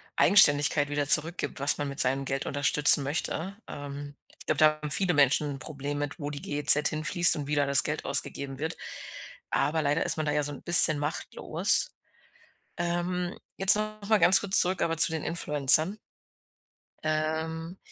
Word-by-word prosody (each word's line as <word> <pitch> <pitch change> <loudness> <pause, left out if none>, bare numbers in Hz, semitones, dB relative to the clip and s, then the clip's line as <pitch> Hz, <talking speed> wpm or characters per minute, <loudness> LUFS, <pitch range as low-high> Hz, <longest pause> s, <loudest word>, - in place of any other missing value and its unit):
Eigenständigkeit 145 -5 +3
wieder 145 -1 -4
zurückgibt, 155 0 0
was 140 +1 +2
man 145 -1 -5
mit 140 - -10
seinem 135 +2 -1
Geld 135 0 -5
unterstützen 145 +1 +2
möchte. 165 +6 -5
Ähm, 145 0 -10 0.2
ich - - -14
glaube, 155 - -3
da 155 - +4 0.2
haben 150 - -6
viele 180 +1 +2
Menschen 145 +1 0
'n - - -13
Problem 145 +1 -7
mit, 145 +3 -7
wo 145 -1 -6
die 145 -1 -9
GEZ 150 0 +3
hin 155 0 -7
fließt 175 +1 +4
und 145 -2 -7
wie 150 - -3
da 145 - -1
das 140 0 +2
Geld 150 +1 -6
ausgegeben 140 -1 -4
wird. 160 +2 -6 0.7
Aber 155 +2 -2
leider 145 +2 -2
ist - - -1
man 155 - -4
da 150 - -1
ja 150 0 -2
so 145 - -4
'n 145 - -12
bisschen 165 -3 +5
machtlos. 150 +1 -2 0.8
Ähm, 175 +1 -5 0.2
jetzt 195 +2 +8
noch 215 0 -6
mal 220 - +3
ganz 185 +3 +6
kurz 200 -1 +2
zurück 180 +1 +1
aber 165 0 -3
zu 165 0 +5
den 160 -2 -6
Influencern. 155 +3 +1 1.1
Ähm, 160 +2 -5
150 Hz, 180 wpm, -25 LUFS, 145-170 Hz, 1.1 s, jetzt